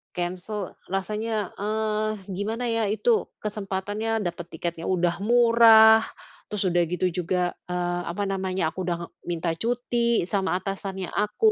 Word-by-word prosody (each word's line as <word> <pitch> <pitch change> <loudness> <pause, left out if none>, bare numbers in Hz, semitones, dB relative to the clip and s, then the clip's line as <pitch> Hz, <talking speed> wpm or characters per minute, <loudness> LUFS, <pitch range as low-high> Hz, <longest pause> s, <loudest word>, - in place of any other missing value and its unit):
cancel. 185 +3 -4
Rasanya, 210 +2 -2
eee, 215 +1 -1 0.2
gimana 215 +6 -3
ya, 230 -1 +1
itu 440 - +2 0.2
kesempatannya 210 +2 -2
dapat 175 -1 -4
tiketnya 165 0 -4
udah 175 -2 +1
murah, 225 -1 +7 0.4
terus 210 -2 -2
udah 175 0 +3
gitu 180 +2 0
juga, 180 0 -1
eee, 175 0 -1
apa 180 +4 -2
namanya, 190 -3 -1
aku 185 - -4
udah 170 -1 -3 0.2
minta 170 -1 -1
cuti 235 +1 +1
sama 190 -3 0
atasannya 190 -1 -4
aku. 210 - +2
195 Hz, 130 wpm, -25 LUFS, 180-220 Hz, 0.4 s, murah